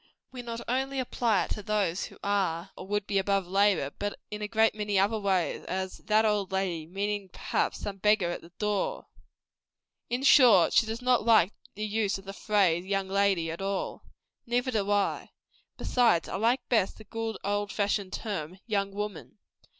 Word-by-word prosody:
We 255 -1 -7
not 235 -1 -6
only 265 +2 -1
apply 235 -4 +1
it - - -12
to 210 - -3
those 200 -4 0
who - - -13
are, 195 -3 -1
or - - -9
would 205 0 -1
be, 200 -1 +1
above 195 0 +1
labor, 195 -6 +2
but 205 0 -3
in 210 0 -5
a 210 - -2
great 220 +1 +3
many 210 -2 -1
other 205 +3 +2
ways 190 -4 0
as 190 0 -3
that 215 0 +2
"old 205 -3 0
lady," 180 -5 -2
meaning, 200 +2 -3
perhaps, - - -1
some 200 -1 -5
beggar 205 -3 +2
at - - -5
the 170 - -14
door, 210 - -1 1.0
&c. 240 - 0
In 255 - -4
short, 235 - +7
she 225 - +4
does 225 +3 -5
not 250 -2 +3
like 215 -4 +4 0.2
the 210 +1 -3
use 210 -1 0
of 195 - -14
the 195 - -7
phrase, 195 -5 +2
young 195 0 -2
lady, 195 -4 +1
at 165 - -6
all. 195 0 -3 0.5
Neither 245 +2 0
do 205 -4 -1
I. 205 -1 0 0.5
Besides, 240 -9 +2
I - - -4
like 235 +6 +1
best 220 -6 +1
the 215 - -12
good 225 +1 -4
old 205 0 -1
fashioned 200 -2 -1
term, 185 -6 -4
YOUNG 200 -3 -1
WOMAN. 210 0 -6
205 Hz, 190 wpm, -28 LUFS, 195-220 Hz, 1.0 s, short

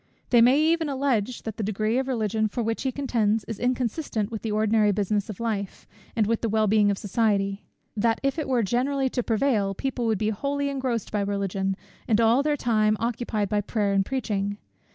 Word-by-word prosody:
They 240 -2 +6
may 255 +5 +6
even 320 0 +2
allege, 255 -4 -1
that 220 -2 -5
the 220 - -2
degree 215 +4 0
of 265 - -2
Religion 220 -3 0
for 230 +3 -3
which 225 0 -2
he 265 - -1
contends 225 -6 0
is 220 0 -6
inconsistent 245 -3 -1
with 220 - -4
the 220 - -3
ordinary 215 0 +3
business 205 +1 -1
of 210 - -7
life, 210 -4 -3 0.3
and 220 -3 +2
with 230 +2 0
the 230 - 0
well 215 0 +2
being 210 0 +4
of 200 - 0
society; 200 -2 0 0.3
that 225 +1 +1
if 275 +3 0
it 305 - -2
were 245 -3 +2
generally 265 +5 0
to 250 - -1
prevail, 220 -4 +1
people 250 +1 -2
would 220 -2 +1
be 215 +2 0
wholly 280 +6 -2
engrossed 260 -5 -2
by 210 - 0
Religion, 195 -1 -1 0.3
and 220 -2 +3
all 230 +3 +4
their 295 0 0
time 215 -4 +2
occupied 230 -3 -1
by 210 -1 +1
prayer 205 -1 -1
and 195 0 +3
preaching. 205 -4 -2
220 Hz, 205 wpm, -25 LUFS, 205-250 Hz, 0.3 s, They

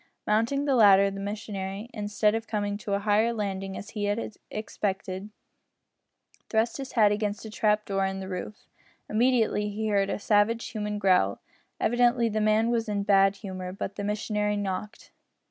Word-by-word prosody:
Mounting 230 +7 +1
the 280 - +2
ladder, 200 -4 +6
the 195 - -6
missionary, 200 0 -5
instead 210 0 +1
of 225 0 -3
coming 205 -2 -1
to 205 -1 -2
a - - 0
higher 215 +2 +3
landing 195 -3 -3
as 205 - -8
he 210 -2 -2
had 210 +2 -2 0.2
expected, 200 -2 -4 1.2
thrust 220 +1 +1
his 270 -1 -7
hat 215 -4 +5
against 210 +1 -2
a 220 - -7
trap 210 0 +1
door 195 -1 0
in 190 0 -4
the 190 - -6
roof. 190 +2 -6 0.4
Immediately 225 -2 +2
he 215 +1 -2
heard 200 -1 +2
a - - -1
savage 210 +2 +2
human 210 -1 -3
growl. 185 - +2 0.4
Evidently 240 0 +3
the 215 0 -1
man 215 +2 +3
was 230 -2 0
in 205 -1 0
a - - -2
bad 195 -1 +4
humour, 185 -2 -6
but 195 +1 -5
the 205 - -4
missionary 210 0 -1
knocked. 200 +1 -5
210 Hz, 175 wpm, -27 LUFS, 200-220 Hz, 1.2 s, ladder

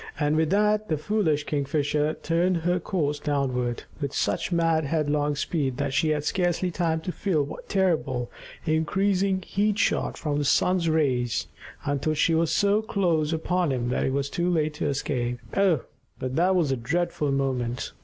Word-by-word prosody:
And 150 0 +2
with 160 0 +2
that 210 +2 +2
the 155 - +1
foolish 160 -4 0
Kingfisher 150 +1 0
turned 170 +2 +2
her 175 +2 0
course 150 -5 -1
downward, 130 -5 -1 0.2
with 140 -1 -3
such - - 0
mad, 165 -2 +2
headlong 150 -1 0
speed 140 -3 -1
that 140 -1 -2
she 155 +3 +2
had 150 -1 0
scarcely 180 +1 0
time 165 -2 0
to 180 - -3
feel 175 -6 0
what 140 - -9
terrible, 155 -10 0 0.3
increasing 190 +4 +1
heat 205 +2 0
shot - - 0
from 145 -2 -1
the - - 0
sun's 170 +4 +2
rays, 130 -7 +1 0.4
until 145 +2 0
she 165 +2 +2
was 165 0 +2
so 205 +1 +3
close 170 -8 0
upon 170 0 0
him 120 -2 -1
that 125 - 0
it - - 0
was 140 0 -1
too 175 +1 0
late 155 -3 +1
to 150 - -2
escape. 125 -3 -1 0.2
Oh, 190 -8 +3 0.4
but 130 0 -4
that 180 +3 +3
was 165 -6 +2
a 135 - 0
dreadful 150 +3 -1
moment! 125 -3 -1
155 Hz, 175 wpm, -26 LUFS, 140-175 Hz, 0.4 s, so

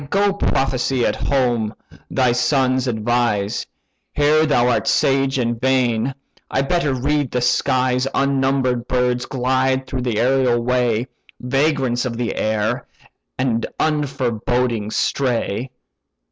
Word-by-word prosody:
Go 200 +2 +2
prophesy 135 -8 0
at - - +1
home, 120 -6 0 0.3
thy 130 -2 +2
sons 130 +1 +1
advise: 110 -3 0 0.5
Here 155 +2 +3
thou 125 -4 +3
art 125 - +1
sage 135 0 +2
in 120 -2 -1
vain—I 130 +1 -1
better 160 0 0
read 140 +2 0
the 125 - -1
skies 125 +1 +1
Unnumber'd 135 -3 +1
birds 125 -1 0
glide 130 0 0
through 130 -1 -4
the 120 -3 -2
aërial 125 0 +2
way; 120 -2 +1 0.3
Vagrants 135 -2 0
of 120 -2 -3
air, 110 -2 -1 0.5
and 120 -3 0
unforeboding 125 -6 -1
stray. 125 -2 -1
125 Hz, 110 wpm, -20 LUFS, 120-135 Hz, 0.5 s, Here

